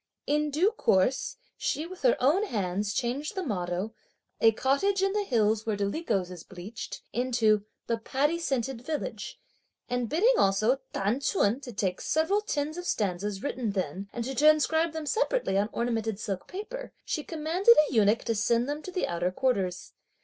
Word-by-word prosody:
In 300 +1 +1
due 335 +9 +2
course, 250 - +1 0.2
she 310 - -1
with 365 +1 -10
her 250 -3 +4
own 315 +11 +3
hands 200 - -1
changed 255 +7 -2
the 380 - -2
motto 185 - -2 0.5
"a 225 - +6
cottage 280 - +1
in 390 0 +2
the 415 0 +1
hills 220 - +2
where 220 -2 -1
dolichos 200 - -1
is 175 -3 -9
bleached" 190 +5 -8
into 225 -4 +2 0.2
"the 230 -1 -1
paddy 290 +8 0
scented 265 -6 -2
village;" 315 - -4 0.5
and 245 -2 -1
bidding 430 +11 +4
also 215 +7 +3
T'an 205 +7 0
Ch'un 260 - +1
to 255 - -8
take 195 -4 -1
the - - -11
several 325 +7 +1
tens 310 -5 -2
of 355 - -6
stanzas 200 0 -1
written 240 -7 -2
then, 190 +1 -3
and 235 -1 -4
to 270 - -3
transcribe 310 +3 +4
them 320 -1 -4
separately 470 - 0
on 200 +2 +2
ornamented 225 -3 -1
silk 195 -4 -4
paper, - - -6
she 305 - -2
commanded 340 +9 +3
a - - -6
eunuch 215 -1 +3
to 230 - 0
send 230 +3 +1
them 295 +1 -3
to 370 - -8
the 365 0 0
outer 175 +1 0
quarters. 190 -5 -1
245 Hz, 175 wpm, -28 LUFS, 205-315 Hz, 0.5 s, a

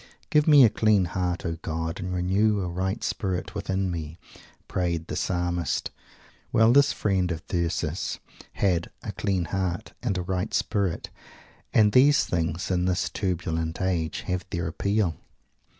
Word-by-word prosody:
"Give 150 0 +4
me 145 -3 +8
a - - +5
clean 105 -4 +3
heart, 90 0 -2
O 85 -1 -2
God, 80 +1 -3
and 90 0 -4
renew 100 +4 +2
a 90 - -2
right 95 +5 -2
spirit 95 -3 -2
within 95 -2 -1
me!" 80 -1 -5 0.5
prayed 85 -3 -1
the - - -5
Psalmist. 90 -1 -1 0.6
Well! 110 +1 +5
this 140 +1 +5
friend 95 -4 0
of 80 +3 -5
Thyrsis 85 -2 -2 0.4
had 90 -4 +1
"a - - -4
clean 95 -4 -1
heart" 95 +3 -3
and 110 -7 -1
"a 90 - -2
right 95 +3 -2
spirit"; 95 -5 -1 0.6
and 105 -2 +5
these 140 +5 +5
things, 85 +1 -2
in 90 -1 +1
this 90 -1 0
turbulent 80 -4 -2
age, 90 -4 -1
have 90 -2 -2
their 85 0 -2
appeal! 100 +1 0
90 Hz, 150 wpm, -26 LUFS, 85-100 Hz, 0.6 s, me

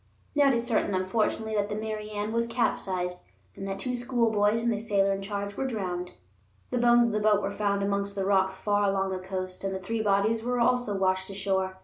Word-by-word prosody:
Now 290 -1 +4
it 270 - +4
is 235 0 -1
certain, 215 -4 +1
unfortunately, 220 +3 0
that 205 -1 0
the 210 - -2
Mary 215 0 -4
Ann 210 +1 -3
was 230 0 +1
capsized 185 -6 -1 0.4
and 195 - -6
that 195 0 -3
two 250 +5 -2
schoolboys 230 -3 +1
and 235 - +2
the 210 - -1
sailor 200 -3 +2
in 195 - -4
charge 200 0 -4
were 270 - -1
drowned. 180 -6 -3 0.6
The 250 - 0
bones 240 0 +5
of 230 - -1
the 215 - +1
boat 210 -1 +3
were 200 - -1
found 200 -1 0
amongst 200 0 -1
the 195 -1 -1
rocks 190 -1 +2
far 205 -1 +2
along 195 0 0
the 185 - -2
coast, 185 0 -5
and 195 -1 -2
the - - -3
three 220 +4 -2
bodies 210 +2 +2
were 245 +1 -1
also 235 -3 +2
washed 185 0 0
ashore. 190 -1 -1
205 Hz, 225 wpm, -28 LUFS, 195-225 Hz, 0.6 s, bones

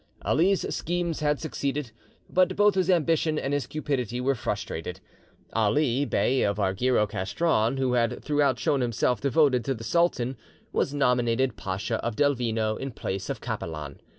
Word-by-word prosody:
Ali's 185 +6 +2
schemes 175 -1 -2
had 150 -1 +1
succeeded, 140 -4 -3 0.4
but 185 0 +2
both 205 0 +4
his 185 -1 0
ambition 165 -2 +2
and 140 -1 -2
his 145 -4 -1
cupidity 125 -6 -2
were 135 +2 +2
frustrated. 100 -7 -4 0.5
Ali, 120 +5 +2
Bey 135 -1 +1
of 100 0 +1
Argyro 105 +4 +2
Castron, 110 - 0
who 130 -2 +1
had 115 -2 0
throughout 145 -4 +2
shown 135 +5 +1
himself 120 +1 0
devoted 140 -3 +3
to 135 - 0
the 115 - -9
sultan, 135 -4 +1 0.4
was - - +1
nominated 125 -3 +1
Pacha 100 +4 -3
of 120 -2 -2
Delvino 115 -5 +1
in 135 - -4
place 95 -5 -4
of - - -4
Capelan. 75 -4 -5
130 Hz, 150 wpm, -26 LUFS, 110-150 Hz, 0.5 s, both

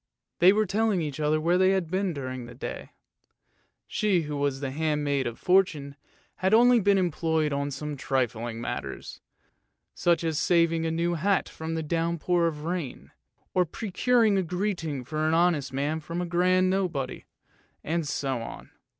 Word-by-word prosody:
They 180 +2 +7
were 215 +2 +2
telling 205 -2 +1
each 150 -1 -5
other 155 +1 +2
where 170 +3 +2
they 190 +1 +4
had 180 -4 -1
been 190 0 0
during 130 -4 -5
the 120 - -11
day; 125 - -6 1.0
she 200 -6 +1
who 150 -1 -4
was 140 -1 -1
the 135 -1 -3
handmaid 145 -3 0
of 120 - -5
Fortune 155 -7 +1 0.4
had 190 +3 +3
only 245 +1 +6
been 200 -1 +3
employed 160 -4 0
on 140 0 -1
some 150 +1 -5
trifling 120 -4 -2
matters, 120 - -6 0.7
such 170 -1 +1
as 160 -2 0
saving 165 -2 +2
a - - 0
new 170 +1 0
hat 190 +4 +1
from 160 0 -5
a 160 - -2
downpour 170 +2 0
of 150 -2 -4
rain, 165 -5 -4 0.4
and 180 -3 +2
procuring 220 0 +2
a - - +2
greeting 175 -6 -2
for 155 +4 -2
an 160 - +2
honest 165 -6 +2
man 145 +4 -1
from 165 +2 -5
a 180 - -1
grand 185 +2 +2
Nobody, 175 -9 -2 0.6
and 165 -1 -1
so 135 -3 -2
on. 115 - -9
165 Hz, 165 wpm, -27 LUFS, 145-185 Hz, 1.0 s, They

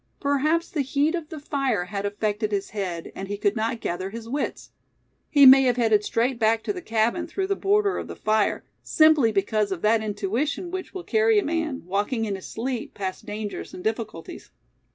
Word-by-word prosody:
Perhaps 300 +4 +1
the 305 - 0
heat 285 +4 +1
of 335 -3 -4
the 315 - -7
fire 275 - -1
had 200 +2 -3
affected 210 +1 -2
his 200 -1 -2
head, 185 -5 -4
and 195 - -6
he 205 +1 -4
could 205 0 +1
not 225 +1 -1
gather 185 0 -3
his 225 +2 -8
wits. 280 +5 -4 0.6
He 285 -2 +6
may 265 +1 +10
have 250 -1 +2
headed 220 -3 +3
straight 235 +3 0
back 225 0 +2
to - - -2
the 365 - -7
cabin, 230 +5 0
through 380 +3 -2
the 395 +1 0
border 405 +1 +1
of - - -6
the - - -7
fire, 215 -1 +1 0.2
simply 310 -7 +4
because 205 0 0
of 180 -3 -4
that 220 +1 +3
intuition 220 - -2
which 375 +1 -6
will 370 - -5
carry 440 +2 +3
a 410 - +2
man, 315 - -2
walking 205 +5 -1
in 205 - -2
his 190 -1 -7
sleep, 245 +1 -4
past 190 -2 -5
dangers 210 0 -5
and 180 - -9
difficulties. 220 -6 -4
230 Hz, 200 wpm, -25 LUFS, 205-300 Hz, 0.6 s, may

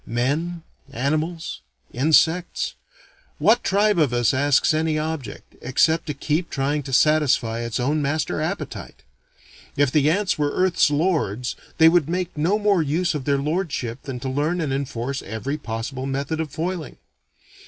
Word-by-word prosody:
Men, 150 +9 -2 0.3
animals, 155 +5 -2 0.3
insects 160 +6 +2 0.6
what 235 +3 +3
tribe 205 -1 +2
of 150 -6 +3
us 120 0 +2
asks 145 +3 +3
any 155 0 0
object, 155 -7 -5
except 160 +7 +2
to 150 - -3
keep 155 +5 -1
trying 145 +2 -1
to 135 -1 -8
satisfy 135 -5 +3
its 115 +1 -3
own 145 +5 +1
master 145 +1 -1
appetite? 175 +6 -5 0.7
If 145 -2 +3
the 150 0 +3
ants 195 0 0
were 145 -1 0
earth's 185 -4 +3
lords 145 - 0 0.2
they 160 - +7
would 165 -2 +4
make 180 0 -2
no 165 +7 +1
more 205 -4 +2
use 165 +4 0
of 145 -4 -4
their 140 -1 +2
lordship 140 -5 -2
than 130 -3 -6
to 135 - -4
learn 150 +6 0
and 150 -5 -1
enforce 135 -1 -3
every 130 +8 -4
possible 130 +2 -4
method 140 +4 -2
of 160 -2 -2
foiling. 165 -1 -4
150 Hz, 155 wpm, -23 LUFS, 135-165 Hz, 0.7 s, they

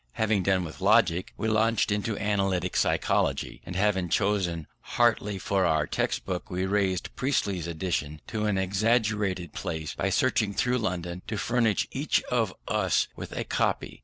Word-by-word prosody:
Having 110 - +1
done 95 0 +2
with 80 +2 -8
Logic, 95 -3 +3
we 110 - -2
launched 110 0 +2
into 105 +1 -1
Analytic 95 -3 0
Psychology, - - +1
and 90 - -6
having 95 -2 +1
chosen 90 -5 0
Hartley 110 -4 +1
for 95 0 0
our 80 -1 +2
text - - -1
book, 90 0 -4
we 90 0 -1
raised 95 -2 0
Priestley's 100 - 0
edition 80 -3 -2
to 110 -2 -2
an 100 -2 +1
extravagant 100 -2 0
price 80 -1 -4
by - - -1
searching 100 -1 +1
through 125 0 +1
London 90 -4 -3
to 110 - -3
furnish 115 -2 +1
each - - 0
of - - +1 0.2
us - - +1
with - - -7
a - - -2
copy. - - -1
95 Hz, 160 wpm, -27 LUFS, 90-105 Hz, 0.2 s, Logic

